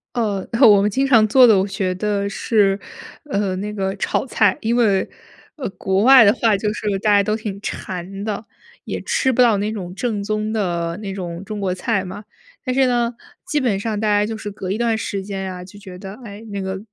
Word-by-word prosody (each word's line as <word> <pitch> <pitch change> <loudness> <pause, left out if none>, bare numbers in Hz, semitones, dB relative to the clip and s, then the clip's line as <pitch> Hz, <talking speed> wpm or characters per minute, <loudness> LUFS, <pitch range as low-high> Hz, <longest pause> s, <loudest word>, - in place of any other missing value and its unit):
呃， 205 -5 -1 0.2
我 205 -2 +7
们 210 - +2
经 270 +7 0
常 225 -5 +5
做 255 +3 +7
的， 220 -4 +6
我 195 - 0
觉 190 -2 -2
得 200 0 -1
是， 200 -2 +1 0.5
呃， 200 -4 -1
那 210 +2 -4
个 195 -1 -2
炒 - - -1
菜。 210 -6 +2
因 230 +2 0
为， 210 -6 +2 0.5
呃， 260 - -4
国 195 +1 0
外 260 -2 +9
的 205 - +6
话 220 -4 +2
就 210 +1 -1
是 205 -2 -2
大 210 0 +1
家 200 - +6
都 215 +2 0
挺 210 -3 -5
馋 190 +2 -6
的， 215 0 -4 0.4
也 - - -4
吃 265 - +1
不 250 - +2
到 230 -4 +5
那 210 +2 -1
种 185 -4 -6
正 210 -2 -2
宗 215 +1 -2
的 175 -5 -2
那 200 -2 -6
种 175 -1 -6
中 210 +1 -5
国 190 -2 -1
菜 195 +1 -1
嘛。 190 +3 -8 0.4
但 255 - -1
是 265 0 +3
呢， 240 -1 +1 0.3
基 295 - 0
本 220 -7 0
上 215 -1 -2
大 215 - 0
家 205 0 +3
就 220 +1 -4
是 210 -1 -6
隔 195 -2 -5
一 210 - -1
段 230 -2 +1
时 195 -3 -4
间 195 -1 -5
呀， 185 -1 -6
就 190 +3 -13
觉 185 -2 -10
得， 195 0 -8
哎， 205 0 -9
那 200 -1 -3
个 190 0 -4
205 Hz, 240 characters per minute, -20 LUFS, 195-220 Hz, 0.5 s, 外